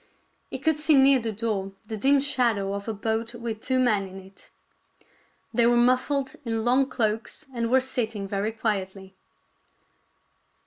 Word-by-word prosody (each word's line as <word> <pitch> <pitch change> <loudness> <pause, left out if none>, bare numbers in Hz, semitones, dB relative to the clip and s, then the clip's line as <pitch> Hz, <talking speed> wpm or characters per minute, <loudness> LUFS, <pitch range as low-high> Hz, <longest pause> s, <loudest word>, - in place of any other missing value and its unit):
He - - -4
could 315 -2 +1
see 305 0 +4
near 270 0 +6
the 230 -1 -3
door 205 -3 -3
the 220 - -5
dim 275 +6 +3
shadow 235 -8 0
of 200 +1 -5
a 225 - -1
boat 225 +3 -2
with 230 -2 -5
two 260 0 0
men 215 -6 +2
in 190 +1 -10
it. 190 +1 -16 1.0
They 235 -1 +4
were 240 0 +4
mufHed 255 +3 +1
in 225 -2 -2
long 260 +3 +3
cloaks 225 +5 -2
and 230 -1 -1
were 260 +2 +4
sitting 225 -6 -3
very 200 +2 -1
quietly. 195 -4 -3
230 Hz, 160 wpm, -26 LUFS, 205-255 Hz, 1.0 s, near